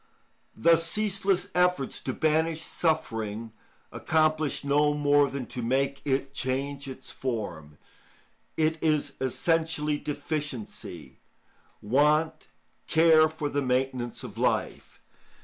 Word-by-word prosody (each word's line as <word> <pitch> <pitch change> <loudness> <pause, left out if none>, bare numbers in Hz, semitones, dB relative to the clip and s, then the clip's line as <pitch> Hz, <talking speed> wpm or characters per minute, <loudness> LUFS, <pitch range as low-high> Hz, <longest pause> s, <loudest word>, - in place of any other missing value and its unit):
The 165 +9 +5
ceaseless 195 +2 +1
efforts 180 -6 +1
to 130 - -3
banish 160 +3 +1
suffering 115 -11 -2 0.4
accomplish 155 -2 +1
no 145 +1 +2
more 145 -1 +3
than 135 -2 -5
to 125 - -4
make 135 +3 0
it 135 0 -1
change 140 +1 -3
its 130 0 -7
form. 85 - -5 0.8
It 160 0 +1
is 150 -3 +1
essentially 150 +2 0
deficiency, 130 - -5 0.6
want, 150 +8 +2 0.4
care 160 -1 +5
for 155 -1 -4
the 145 0 -1
maintenance 125 -2 -1
of - - -8
life. - - -1
145 Hz, 105 wpm, -27 LUFS, 130-160 Hz, 0.8 s, The